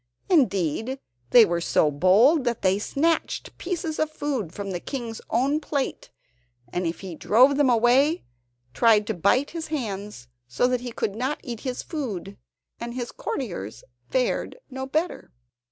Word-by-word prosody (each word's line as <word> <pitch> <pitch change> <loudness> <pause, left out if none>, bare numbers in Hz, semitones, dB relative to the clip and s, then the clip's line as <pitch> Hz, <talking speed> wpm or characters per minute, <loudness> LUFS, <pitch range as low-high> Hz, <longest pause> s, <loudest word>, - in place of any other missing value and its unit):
Indeed, 235 - +2 0.3
they 240 -2 +8
were 170 -2 -1
so 155 -2 +2
bold 205 - +5
that 240 -1 -1
they 190 +1 +3
snatched 320 +9 -1
pieces 340 -3 -3
of 310 - +1
food 280 - -3
from 200 +1 -5
the 175 - -3
King's 235 0 -5
own 270 +6 +2
plate, 285 -3 -3 0.6
and 175 -1 0
if 165 - -4
he 190 -3 -6
drove 250 - +4
them 285 -2 +3
away, 250 +7 +3 0.5
tried 220 -3 +4
to 220 - -1
bite 210 - +2
his 330 -2 -5
hands, 205 - -5 0.2
so 120 - +1
that 250 -1 +1
he 245 -1 -5
could 205 - -2
not 260 +6 -2
eat 235 -4 -6
his 255 0 -4
food, 205 - -5 0.4
and 235 +1 -5
his 245 -2 -4
courtiers 175 - -5 0.3
fared 255 - 0
no 265 0 -5
better. 315 +6 -2
240 Hz, 155 wpm, -25 LUFS, 200-280 Hz, 0.6 s, they